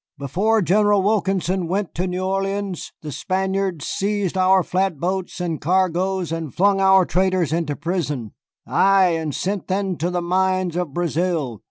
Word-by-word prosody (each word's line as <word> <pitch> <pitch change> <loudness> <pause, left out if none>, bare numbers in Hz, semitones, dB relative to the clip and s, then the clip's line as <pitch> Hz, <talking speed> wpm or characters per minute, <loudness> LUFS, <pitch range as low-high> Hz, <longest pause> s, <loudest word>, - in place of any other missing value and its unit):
Before 195 - +1
General 205 +2 +3
Wilkinson 190 -3 0
went 195 +2 -2
to 180 +3 -2
New 180 +1 -3
Orleans 195 -1 -2
the 150 - -5
Spaniards 190 -1 -2
seized 200 -2 -1
our 185 0 +4
flat 185 -4 -1
boats 185 +2 -3
and 170 -4 -3
cargoes 185 +1 0
and 165 -3 -4
flung 195 +4 +2
our 190 -1 +5
traders 185 -4 +1
into 160 -3 -1
prison, 150 - -3 0.3
ay, 195 -1 +4
and 160 -4 -2
sent 195 +1 -3
them 190 -1 -1
to 170 +3 -1
the 180 0 -1
mines 185 0 0
of 175 -4 -2
Brazil. 165 - -1
185 Hz, 155 wpm, -21 LUFS, 170-195 Hz, 0.3 s, our